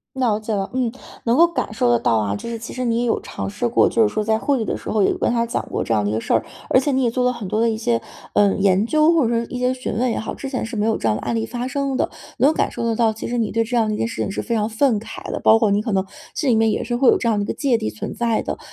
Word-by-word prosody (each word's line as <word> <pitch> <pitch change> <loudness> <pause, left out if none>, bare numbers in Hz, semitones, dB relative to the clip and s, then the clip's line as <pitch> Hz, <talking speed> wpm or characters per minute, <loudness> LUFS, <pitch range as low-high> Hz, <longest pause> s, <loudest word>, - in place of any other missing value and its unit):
了 235 -5 +1
解 220 +1 -4
了， 195 -2 -1
嗯， 255 -2 0 0.3
能 235 +1 +2
够 340 - +8
感 340 -9 -3
受 160 - +1
得 120 - +5
到 115 -1 +1
啊， 105 -2 0
就 235 - -6
是 230 - -4
其 230 - -8
实 255 - -3
你 230 -1 +1
也 - - 0
有 225 - +1
尝 - - -6
试 210 +4 -2
过， 235 - +4
就 230 - +2
是 210 -1 +2
说 215 0 -1
在 220 +1 +2
会 270 +3 0
议 - - -1
的 - - -2
时 - - -7
候 210 -2 +2
有 - - +2
跟 - - 0
他 235 -1 +1
讲 235 - -2
过 - - -2
这 115 - 0
样 105 -1 +1
一 - - 0
个 110 +1 -1
事 - - -3
儿。 115 - +2 0.2
而 255 - +5
且 285 - -1
你 265 -1 +1
也 235 - +2
做 250 +1 0
了 250 - +3
很 230 -5 -6
多 215 +4 -1
的 230 0 +3
一 220 - -2
些， 115 - 0 0.3
呃， 205 -1 +4
研 195 0 +3
究， 310 +5 +4
或 325 - +3
者 235 - +2
说 230 0 0
一 250 - -6
些 250 0 +2
询 255 -5 -4
问 245 +2 +1
也 - - -1
好， 220 - -4
之 275 - -6
前 255 -4 -2
是 230 - -7
没 210 - 0
有 225 0 +2
这 115 - 0
样 110 - +2
的 - - -6
案 120 -1 -1
例 110 0 -1
发 245 - -4
生 275 0 -1
的。 - - 0 0.3
能 275 +5 +5
感 - - 0
受 - - -5
得 230 -1 0
到， 225 -1 +3
其 220 - -6
实 245 - -2
你 225 -3 -1
对 230 - +2
这 240 +2 -2
样 225 -2 +2
的 215 - -1
一 - - -4
件 225 - 0
事 230 - -6
情 - - -1
是 - - -3
非 235 - -5
常 215 -2 +1
愤 230 0 +2
慨 220 - -8
的， - - -2
包 225 - +5
括 215 - +3
你 200 +1 +2
可 220 0 -3
能 190 -1 +1 0.3
心 290 -5 0
里 230 - +4
面 225 -1 +3
也 - - -1
是 240 +1 -2
会 255 +1 +3
有 - - +6
这 235 - -1
样 220 -2 +2
的 205 - 0
一 - - -5
个 - - -3
芥 260 -5 +1
蒂 - - -2
存 105 0 -6
在 230 -2 0
的。 - - -4
225 Hz, 390 characters per minute, -21 LUFS, 210-250 Hz, 0.3 s, 够